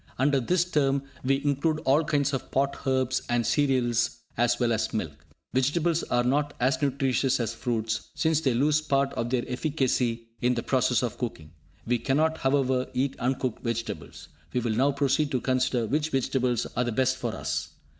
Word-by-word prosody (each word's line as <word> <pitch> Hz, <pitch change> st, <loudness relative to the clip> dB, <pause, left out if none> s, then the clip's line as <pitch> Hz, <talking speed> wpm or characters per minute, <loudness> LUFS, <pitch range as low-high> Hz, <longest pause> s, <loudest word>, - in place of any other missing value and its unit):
Under 140 Hz, +1 st, +3 dB
this 175 Hz, +8 st, +1 dB
term 140 Hz, -5 st, +1 dB, 0.2 s
we 135 Hz, +2 st, +1 dB
include 145 Hz, +2 st, +1 dB
all 140 Hz, +5 st, +4 dB
kinds 145 Hz, -2 st, 0 dB
of 135 Hz, -, -3 dB
pot 140 Hz, 0 st, -1 dB
herbs 130 Hz, -1 st, +1 dB
and 120 Hz, -1 st, +1 dB
cereals, 120 Hz, -5 st, +1 dB
as 120 Hz, 0 st, +2 dB
well 120 Hz, -2 st, +2 dB
as 110 Hz, -, -1 dB
milk. 75 Hz, -7 st, -5 dB, 0.3 s
Vegetables 155 Hz, +6 st, +1 dB
are 120 Hz, 0 st, 0 dB
not 145 Hz, +3 st, 0 dB
as 130 Hz, +4 st, +1 dB
nutritious 135 Hz, -2 st, +1 dB
as 115 Hz, -, -1 dB
fruits, 110 Hz, -2 st, -2 dB
since 160 Hz, -1 st, +2 dB
they 130 Hz, -6 st, +1 dB
lose 150 Hz, +4 st, +3 dB
part 140 Hz, -2 st, +1 dB
of 115 Hz, -, -2 dB
their 125 Hz, -1 st, 0 dB
efficacy 125 Hz, -4 st, -1 dB
in 125 Hz, +1 st, +2 dB
the 120 Hz, -, -2 dB
process 125 Hz, -2 st, +2 dB
of 120 Hz, -, -3 dB
cooking. 85 Hz, -11 st, -5 dB, 0.3 s
We 120 Hz, +1 st, +1 dB
cannot, 155 Hz, +5 st, +1 dB
however, 130 Hz, -2 st, +1 dB
eat 130 Hz, +2 st, 0 dB
uncooked 125 Hz, -1 st, -1 dB
vegetables. 115 Hz, -10 st, -5 dB, 0.2 s
We 125 Hz, -, +1 dB
will 120 Hz, -1 st, -1 dB
now 135 Hz, +6 st, +3 dB
proceed 140 Hz, +1 st, +1 dB
to 130 Hz, -, +2 dB
consider 130 Hz, -2 st, +1 dB
which 150 Hz, +6 st, 0 dB
vegetables 130 Hz, -3 st, 0 dB
are 125 Hz, -, +2 dB
the 120 Hz, -, -2 dB
best 130 Hz, +3 st, +1 dB
for 120 Hz, -3 st, -3 dB
us. 75 Hz, +2 st, -3 dB
130 Hz, 180 wpm, -27 LUFS, 120-140 Hz, 0.3 s, all